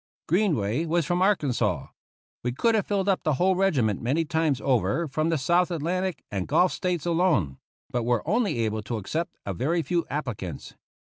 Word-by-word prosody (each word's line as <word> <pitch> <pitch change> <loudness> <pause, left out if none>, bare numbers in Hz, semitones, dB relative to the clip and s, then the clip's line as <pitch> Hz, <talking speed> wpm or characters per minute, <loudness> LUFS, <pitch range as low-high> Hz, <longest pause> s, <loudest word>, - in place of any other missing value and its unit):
Greenway 160 - +1
was 170 0 +1
from 175 +3 0
Arkansas. 185 - +1 0.6
We 125 - -1
could 230 - +2
have 215 -3 +1
filled 200 -1 0
up 195 -2 +2
the 155 -3 +1
whole 185 +6 +2
regiment 140 - +1
many 145 +8 +1
times 155 -3 +1
over 130 - +1
from 155 +3 -1
the 165 - +1
South 170 +6 +2
Atlantic 180 +2 -2
and 95 -3 -2
Gulf 180 - +3
States 180 -4 -2
alone, 165 - +1 0.3
but 125 -3 -2
were 120 -1 0
only 220 - +1
able 110 0 -2
to 110 +3 -4
accept 155 - -3
a 100 - -2
very 160 - 0
few 175 0 0
appli 140 -6 -3
cants. 90 -3 -7
160 Hz, 185 wpm, -26 LUFS, 120-180 Hz, 0.6 s, Gulf